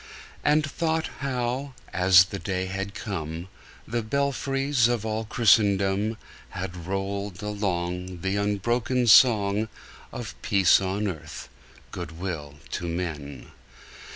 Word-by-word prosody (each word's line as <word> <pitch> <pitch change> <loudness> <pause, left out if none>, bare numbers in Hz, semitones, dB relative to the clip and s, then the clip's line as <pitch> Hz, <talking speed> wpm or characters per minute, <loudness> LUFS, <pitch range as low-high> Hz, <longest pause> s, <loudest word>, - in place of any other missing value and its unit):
And 150 +1 +3
thought 160 +2 -1
how, 130 0 -2 0.2
as 90 0 +7
the 100 +1 -6
day 95 -2 -2
had 100 +2 -4
come, 85 -3 -5 0.4
The 115 +2 -1
belfries 135 +1 +1
of 120 -3 -1
all 110 0 -2
Christendom 100 -1 +3 0.3
Had 90 -2 -6
rolled 100 0 -3
along 90 -3 -3
The 95 +2 -1
unbroken 115 +5 0
song 110 -2 +5 0.4
Of 110 -5 -6
peace 100 -3 +4
on 100 +2 -1
earth, 80 -4 -7 0.4
good 85 -3 -6
will 80 -6 -5 0.2
to 85 - -3
men! 75 -6 -5
100 Hz, 115 wpm, -26 LUFS, 90-120 Hz, 0.4 s, as